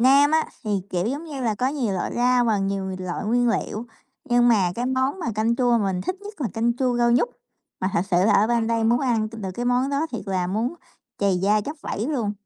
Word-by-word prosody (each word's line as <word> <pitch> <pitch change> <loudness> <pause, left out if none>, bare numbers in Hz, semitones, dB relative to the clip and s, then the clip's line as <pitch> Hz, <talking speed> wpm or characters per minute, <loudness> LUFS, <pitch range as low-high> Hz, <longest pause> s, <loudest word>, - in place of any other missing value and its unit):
Nam 275 +4 +6
á, 315 0 +3 0.2
thì, 215 - -3 0.2
kiểu 180 +2 -1
giống 285 +7 -3
như 290 -4 -6
là, 225 -3 +1
có 255 +5 0
nhiều 255 -9 -1
loại 180 - -2
rau 245 0 +3
và 220 -3 +2
nhiều 195 -1 -2
loại 185 +1 -4
nguyên 245 +2 +2
liệu. 230 0 -2 0.4
Nhưng 240 0 +3
mà 195 -7 +3
cái 240 +1 -2
món 260 +6 0
mà 340 - -4
canh 225 +2 +1
chua 245 -2 +3
mình 195 -3 -1
thích 355 - -3
nhất 410 -4 -10
là 245 - 0
canh 235 +1 +1
chua 250 -2 +1
rau 240 0 +3
nhút. 250 - +3 0.5
Mà 185 - 0
thật 170 - +2
sự 175 - +3
là 210 - +4
ở 205 +2 +4
bên 235 -1 +1
đây 230 -1 +1
muốn 235 +2 +3
ăn 230 -5 +1
t 225 - -13
được 200 -4 -5
cái 240 - -3
món 250 +3 +1
đó 285 +3 0
thiệt 235 - -4
là 185 -2 0
muốn 220 - -1 0.4
trầy 200 -2 +2
da 205 +3 +2
tróc 295 +9 -6
vẩy 215 - -3
luôn. 230 -9 -1
235 Hz, 255 wpm, -23 LUFS, 205-255 Hz, 0.5 s, Nam